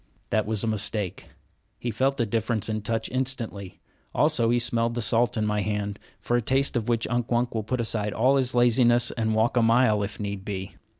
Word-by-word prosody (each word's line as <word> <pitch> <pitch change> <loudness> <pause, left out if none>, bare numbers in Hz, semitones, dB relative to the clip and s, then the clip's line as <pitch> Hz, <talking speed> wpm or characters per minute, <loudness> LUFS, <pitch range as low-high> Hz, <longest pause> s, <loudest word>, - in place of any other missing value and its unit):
That 110 -1 +1
was 110 -2 0
a - - -1
mistake. 105 -3 -2 0.5
He 120 - -3
felt 135 +5 0
the 120 - +1
difference 110 0 -1
in 110 - -1
the - - -5
touch 115 +1 -2
instantly. 125 -7 -3 0.3
Also 145 -7 +2
he 120 - +3
smelled 115 -1 0
the 120 - -1
salt 120 +1 +2
in 110 - 0
my 105 0 0
hand, 105 0 -3 0.2
for 105 +4 -1
a 120 - +2
taste 135 +4 +1
of 120 0 -1
which 115 -1 +1
Unk 120 -1 -1
Wunk 120 0 0
will 110 - -1
put 125 +4 -3
aside 110 -2 -2
all 130 +6 +3
his 130 -2 0
laziness 120 0 +4
and 110 -2 -1
walk 115 +3 +1
a - - +5
mile, 115 -2 +3
if 100 +1 -5
need 100 -2 -4
be. 95 -1 -5
115 Hz, 220 wpm, -25 LUFS, 105-120 Hz, 0.5 s, a